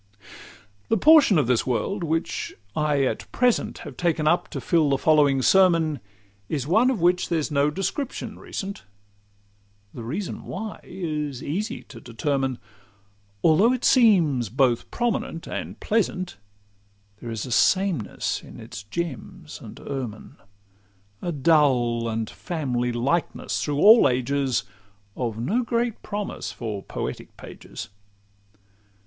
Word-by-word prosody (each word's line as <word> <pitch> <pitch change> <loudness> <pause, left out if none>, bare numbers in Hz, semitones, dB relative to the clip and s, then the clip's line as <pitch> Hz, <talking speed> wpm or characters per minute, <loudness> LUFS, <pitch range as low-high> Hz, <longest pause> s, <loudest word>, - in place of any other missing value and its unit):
The 225 - +3
portion 295 - +6
of 150 - +3
this 125 0 +1
world 175 - -1
which 165 0 -2 0.2
I 150 -2 +1
at 130 - -2
present 245 -1 +1
Have - - -9
taken 165 -3 0
up 175 +3 +2
to - - -5
fill 160 -4 +2
the 135 - +2
following 145 -3 +3
sermon, 165 -5 +4 0.5
Is 140 -5 -2
one 220 - +4
of 255 -6 0
which 180 +1 +2
there's 160 -3 -1
no 140 0 +3
description 215 - -4
recent. 200 0 -6 1.1
The 120 - -7
reason 160 - -5
why 215 +3 -6
is 150 -7 -4
easy 200 +10 -3
to 115 -4 -13
determine: 135 +2 -1 0.9
Although 190 +9 +5
it 255 - -2
seems 170 - +4
both 125 0 +1
prominent 230 -8 -2
and - - -6
pleasant, 185 - -1 0.8
There 120 - -6
is 115 -2 -4
a 125 - -7
sameness 185 - +1
in - - -12
its - - -8
gems 130 +8 -6
and - - -10
ermine, 125 -6 -6 0.8
A 175 - -2
dull 130 -7 +2
and 110 0 -2
family 125 -8 -2
likeness 135 +8 -1
through 145 -1 -1
all 220 +9 +7
ages, 130 +1 0 0.5
Of 115 -4 -3
no 190 - 0
great 235 -1 -1
promise 205 -1 -4
for 110 -4 -5
poetic - - -6
pages. - - -9
155 Hz, 130 wpm, -24 LUFS, 130-190 Hz, 1.1 s, all